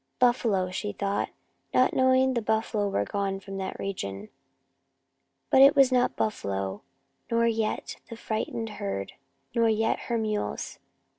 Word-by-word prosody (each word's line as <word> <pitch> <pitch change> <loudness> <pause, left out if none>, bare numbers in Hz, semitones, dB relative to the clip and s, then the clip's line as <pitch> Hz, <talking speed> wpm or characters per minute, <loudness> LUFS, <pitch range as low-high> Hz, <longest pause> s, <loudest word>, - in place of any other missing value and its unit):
Buffalo, 225 -7 +2
she 205 +2 -3
thought, 200 +1 -1 0.5
not 255 - +4
knowing 260 0 +4
the 235 - 0
buffalo 220 -1 0
were 100 - 0
gone 195 - -2
from 195 0 -8
that 190 -1 -4
region. 105 - -5 1.2
But 265 - +7
it 275 +1 +8
was 275 -2 +6
not 250 -1 +3
the - - +2
buffalo, 95 - -3 0.5
nor 230 0 +2
yet 225 -2 -1
the 230 - -8
frightened 225 0 -3
herd, 100 - -3 0.4
nor 230 -1 +3
yet 225 0 +1
her 235 - +1
mules. 215 -2 -3
215 Hz, 145 wpm, -27 LUFS, 195-235 Hz, 1.2 s, it